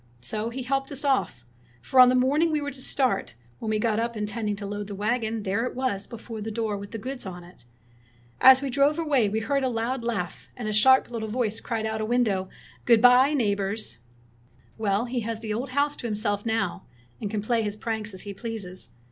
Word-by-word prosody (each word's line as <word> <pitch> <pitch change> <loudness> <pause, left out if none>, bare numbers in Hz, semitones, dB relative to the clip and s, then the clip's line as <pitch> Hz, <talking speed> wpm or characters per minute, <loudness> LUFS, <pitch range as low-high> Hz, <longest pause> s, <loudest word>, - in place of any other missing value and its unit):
So 215 - -3
he 255 +2 -5
helped 270 +2 -1
us 285 +1 -4
off; 195 - 0 0.3
for 255 - +1
on 250 -1 +10
the 255 - +3
morning 285 +6 +3
we 305 - +1
were 285 -1 -3
to 265 -1 -8
start, 260 - 0 0.2
when 225 - -4
we 215 - +1
got 215 0 +1
up 235 0 -2
in 210 - -1
tending 210 -1 -2
to 200 0 -7
load 205 0 -4
the 205 - -6
wagon, 220 +1 -1
there 200 +3 0
it 250 - -3
was 250 -6 -2
before 225 -1 -8
the 220 - -4
door 220 -1 -2
with 200 0 -7
the 225 - -5
goods 260 +4 -6
on 180 -1 -7
it. 175 -8 -15 0.7
As 265 +1 +8
we 275 - -2
drove 280 +4 +3
away 285 -10 +2
we 220 +2 -1
heard 275 +4 0
a 260 - +2
loud 235 +2 -2
laugh; 210 -7 -3
and 240 -3 -4
a 215 - -1
sharp 260 +4 +5
lit 230 -2 -4
tle 220 - -4
voice 220 -2 -1
cried 225 -2 -2
out 220 0 -2
of 215 - -2
a - - -7
window, 210 -7 +1 0.2
' - - -25
Good 235 -2 +6
bye, 250 +5 +6
neighbors! 200 - -1 0.4
' 120 - -31
''Well, 210 +2 +1
he 245 +1 -2
has 225 -1 -3
the 220 -1 -3
old 245 +5 -3
house 285 +3 +1
to 240 - -4
himself 210 -1 -1
now, 220 -5 -1 0.3
and 210 - -2
can 210 -1 -2
play 230 +1 +1
his 210 -1 -2
pranks 220 -1 -3
as 185 - -7
he 205 - -6
pleases. 195 -4 -5
225 Hz, 240 wpm, -26 LUFS, 205-255 Hz, 0.7 s, on